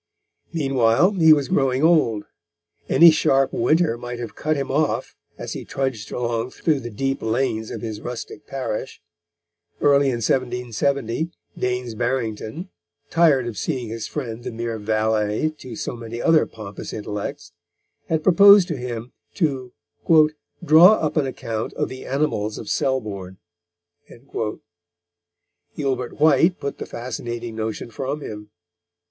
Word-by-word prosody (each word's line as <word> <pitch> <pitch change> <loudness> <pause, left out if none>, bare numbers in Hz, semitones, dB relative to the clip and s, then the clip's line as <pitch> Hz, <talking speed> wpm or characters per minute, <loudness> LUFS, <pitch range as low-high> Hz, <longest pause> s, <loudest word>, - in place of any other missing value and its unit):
Meanwhile, 135 - +3
he 165 -5 +5
was 145 -3 +4
growing 135 0 +1
old. 150 -11 +3 0.6
Any 170 0 +8
sharp 135 -3 +2
winter 155 -1 +2
might 120 0 -6
have 115 -3 -6
cut 155 +1 -1
him 135 -1 -3
off, 150 +2 0 0.2
as - - -5
he - - -6
trudged 130 -6 -3
along 120 0 -2
through 150 +2 0
the 120 -2 -6
deep 135 +5 -2
lanes 110 -1 -1
of - - -6
his 110 -2 -5
rustic 125 +5 -7
parish. 130 -3 -4 0.8
Early 140 -1 +4
in 130 - +1
1770 125 +4 -1 0.3
Daines 125 -1 -2
Barrington, 120 - -3 0.4
tired 155 -7 +4
of 115 -5 -5
seeing 125 - -3
his 115 0 -5
friend 120 -5 -5
the - - -4
mere 115 -1 -4
valet 110 +4 0
to 125 -3 -8
so 120 - -4
many 115 0 -7
other 160 +3 +4
pompous 105 -3 -8
intellects, 105 -1 -5 0.6
had 160 -1 0
proposed 200 +1 +7
to 160 - -2
him 120 -1 -5 0.2
to 135 -8 -1 0.9
"draw 170 +6 +8
up 155 -8 -1
an 150 -4 +2
account 115 -4 -4
of - - -2
the 130 0 -9
animals 130 -7 -1
of 110 - -7
Selborne." 100 -8 -2 2.4
Gilbert 130 -3 -3
White 160 +4 +4
put 140 -1 -5
the - - -5
fascinating 120 -1 -5
notion 110 +1 -4
from 135 +6 -4
him. 105 -4 -8
125 Hz, 135 wpm, -22 LUFS, 115-145 Hz, 2.4 s, Any